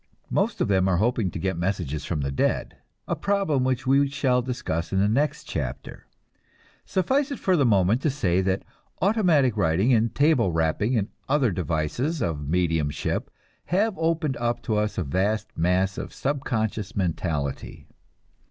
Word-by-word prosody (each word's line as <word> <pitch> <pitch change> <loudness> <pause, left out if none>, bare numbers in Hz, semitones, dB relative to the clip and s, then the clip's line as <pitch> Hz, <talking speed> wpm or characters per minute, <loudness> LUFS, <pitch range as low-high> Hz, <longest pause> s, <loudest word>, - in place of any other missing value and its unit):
Most - - 0
of - - +2
them 95 -2 +2
are 95 -2 +2
hoping 110 -1 +1
to - - -6
get 95 0 -2
messages 85 -5 -2
from 80 -4 -2
the 70 0 -2
dead 70 - -1 0.3
a - - 0
problem 195 -10 +1
which 130 -1 0
we 140 +1 +3
shall 130 -3 +1
discuss 115 -10 -3
in 95 - 0
the 100 - +3
next 140 +8 0
chapter. - - -5 0.8
Suffice 265 - +1
it 280 - -4
for 185 - +2
the 140 -6 +3
moment 100 +3 +3
to 155 - +1
say 95 -10 +1
that 95 0 0 0.4
automatic 175 - +3
writing 95 +6 +2
and 115 0 +2
table 140 - +3
rapping 80 +9 +1
and 105 -1 -1 0.2
other 135 -5 +3
devices 90 - -1
of 75 - -2
mediumship 80 -4 0 0.4
have 205 +5 +1
opened 160 -3 0
up 120 0 -1
to 110 - -1
us 105 0 -1
a 95 - 0
vast 95 +9 -1
mass 90 +3 +1
of - - -7
subconscious 115 -6 -2
mentality. 80 -7 -3
110 Hz, 160 wpm, -25 LUFS, 90-140 Hz, 0.8 s, we